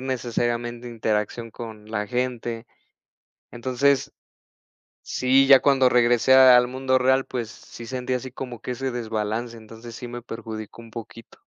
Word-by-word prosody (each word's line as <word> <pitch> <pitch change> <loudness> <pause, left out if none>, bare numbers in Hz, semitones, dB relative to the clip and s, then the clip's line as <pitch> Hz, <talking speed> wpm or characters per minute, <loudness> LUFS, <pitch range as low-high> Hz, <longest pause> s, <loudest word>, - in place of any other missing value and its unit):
necesariamente 120 -1 -2
interacción 115 0 -2
con 110 -1 -10
la 105 -1 -2
gente. 120 0 -3 0.9
Entonces, 130 +3 0 0.9
sí, 130 +1 +3
ya 135 -1 +8
cuando 135 -2 +4
regresé 120 +1 +4
al 130 -2 +7
mundo 130 +1 0
real, 130 +1 +3
pues, 120 -4 -4
sí 115 - -12
sentía 125 +1 -3
así 130 +1 -8
como 125 -2 -7
que - - -6
ese 130 +2 -3
desbalance, 115 0 -3
entonces, 115 +1 -12
sí 125 - -7
me 120 0 -7
perjudicó 110 -1 -8
un 115 - -14
poquito. 115 0 -10
120 Hz, 140 wpm, -24 LUFS, 115-130 Hz, 0.9 s, ya